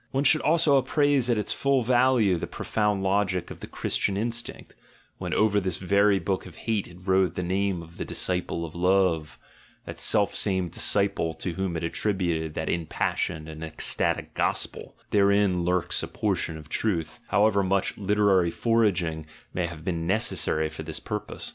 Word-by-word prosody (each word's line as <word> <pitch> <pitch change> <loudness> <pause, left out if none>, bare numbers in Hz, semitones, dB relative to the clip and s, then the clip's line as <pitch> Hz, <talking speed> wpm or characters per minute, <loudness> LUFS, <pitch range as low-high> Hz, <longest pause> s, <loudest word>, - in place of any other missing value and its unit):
(One 135 +1 0
should 155 +2 +5
also 155 -2 +4
appraise 135 -1 +2
at 120 - +2
its 105 - 0
full 140 -2 +1
value 120 -5 +3
the 85 - -4
profound 105 -2 -1
logic 95 -2 0
of - - -9
the - - -8
Christian 100 -1 -1
instinct, 120 +2 -4 0.5
when - - -4
over 105 -1 +3
this 95 -4 -2
very 100 +2 +3
book 95 -1 -2
of 85 - -13
hate 110 -4 0
it 85 - -14
wrote 95 -2 +2
the 90 - -2
name 95 -1 -1
of 85 +1 -15
the - - -3
Disciple 90 -2 -1
of 80 - -9
Love, 90 -3 +1 0.5
that - - -7
self 105 -2 +2
same 95 -3 0
disciple 100 -2 0
to 90 - -4
whom 95 -1 -2
it 80 - -5
attributed 85 -3 -1
that - - -3
impassioned 80 -1 -2
and 80 0 -8
ecstatic 80 -1 0
Gospel - - -2
— - - -40
therein 100 -3 +3
lurks 90 0 0
a - - -4
portion 80 - -2
of 75 -1 -11
truth, 80 -4 -2
however 100 -1 +3
much 95 0 0
literary 100 -3 +2
forging 90 -9 0 0.3
may 90 -1 -1
have 80 -1 -10
been 85 -3 -2
necessary 90 -6 0
for 80 - -8
this 80 +1 -5
purpose.) 105 -1 -5
95 Hz, 175 wpm, -26 LUFS, 85-105 Hz, 0.5 s, should